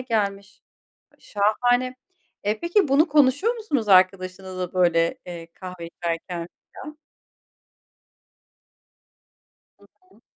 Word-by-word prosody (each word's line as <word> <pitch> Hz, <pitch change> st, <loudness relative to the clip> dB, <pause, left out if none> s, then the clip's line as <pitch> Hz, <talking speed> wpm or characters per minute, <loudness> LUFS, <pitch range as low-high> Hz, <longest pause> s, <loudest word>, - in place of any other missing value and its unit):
gelmiş 200 Hz, -5 st, -3 dB, 0.6 s
şahane. 245 Hz, +5 st, +1 dB, 0.5 s
Eee, 210 Hz, +2 st, 0 dB
peki 345 Hz, 0 st, +2 dB
bunu 295 Hz, +5 st, +4 dB
konuşuyor 295 Hz, -, +3 dB
musunuz 295 Hz, -, -2 dB
arkadaşınızla, 185 Hz, -1 st, +2 dB
böyle, 170 Hz, -2 st, +2 dB
eee, 170 Hz, -2 st, -8 dB
kahve 180 Hz, -2 st, -9 dB
içerken 170 Hz, 0 st, -5 dB, 0.3 s
falan? 300 Hz, 0 st, -10 dB, 2.8 s
Hı -, -, -21 dB, 0.2 s
hı. -, -, -24 dB
200 Hz, 85 wpm, -23 LUFS, 180-260 Hz, 2.8 s, bunu